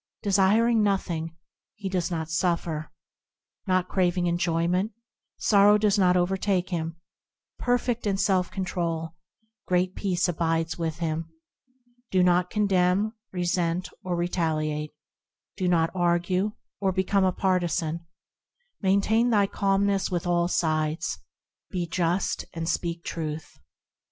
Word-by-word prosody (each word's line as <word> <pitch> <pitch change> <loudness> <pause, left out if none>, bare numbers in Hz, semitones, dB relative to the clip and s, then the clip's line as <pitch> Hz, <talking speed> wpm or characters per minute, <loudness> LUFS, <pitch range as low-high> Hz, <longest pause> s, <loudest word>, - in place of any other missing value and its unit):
Desiring 210 +3 +4
nothing, 170 -5 -1 0.4
he 200 -2 -5
does 180 -3 -1
not 160 -3 -3
suffer; 165 -2 -1 0.8
Not 185 -1 +2
craving 180 -2 +1
enjoyment, 175 +3 0 0.4
sorrow 205 0 +5
does 210 -1 +2
not 180 -1 +4
overtake 185 +1 0
him; 165 -1 -2 0.6
Perfect 245 -2 0
in 195 -1 +1
self 185 -2 +2
control, 170 -4 -3 0.5
great 180 0 +1
peace 185 -3 0
abides 165 -1 0
with 165 -2 -3
him; 165 -1 -2 0.8
Do 185 -1 +3
not 180 0 +3
condemn, 200 0 +2 0.2
resent 175 0 -1
or 180 -1 -1
retaliate; 155 -3 -1 0.7
Do 185 -2 -1
not 165 -2 +2
argue, 180 +3 +1 0.3
or 195 -2 +1
become 190 +1 +1
a 185 - +3
partisan; 170 -3 -1 0.7
Maintain 205 +4 +3
thy 205 -4 +4
calmness 195 0 +1
with 175 -1 -2
all 175 -1 +2
sides; 155 -2 0 0.5
Be 180 -2 -2
just, 175 +2 -1
and 165 0 -3
speak 170 0 -2
truth. 155 -1 -5
180 Hz, 115 wpm, -26 LUFS, 165-195 Hz, 0.8 s, sorrow